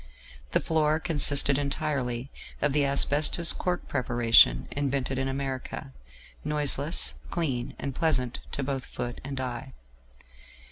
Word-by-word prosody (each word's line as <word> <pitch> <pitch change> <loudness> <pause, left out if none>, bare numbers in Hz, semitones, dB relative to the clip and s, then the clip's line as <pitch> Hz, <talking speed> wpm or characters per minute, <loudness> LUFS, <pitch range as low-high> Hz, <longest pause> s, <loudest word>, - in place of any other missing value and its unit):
The - - +4
floor 155 -1 +1
consisted 145 -4 +4
entirely 140 -3 -2 0.3
of 150 -1 0
the 150 0 +3
asbestos 145 +4 +3
cork 180 -1 -3
preparation 120 - +4
invented 135 -2 -2
in 135 - -1
America, 135 - -5 0.5
noiseless, 150 +1 -1 0.2
clean, 135 -8 -2
and 140 - -5
pleasant 130 -6 0
to 140 - -2
both 135 -1 -3
foot 120 0 -6
and 135 -1 -5
eye. 120 - -5
140 Hz, 120 wpm, -27 LUFS, 125-150 Hz, 0.5 s, The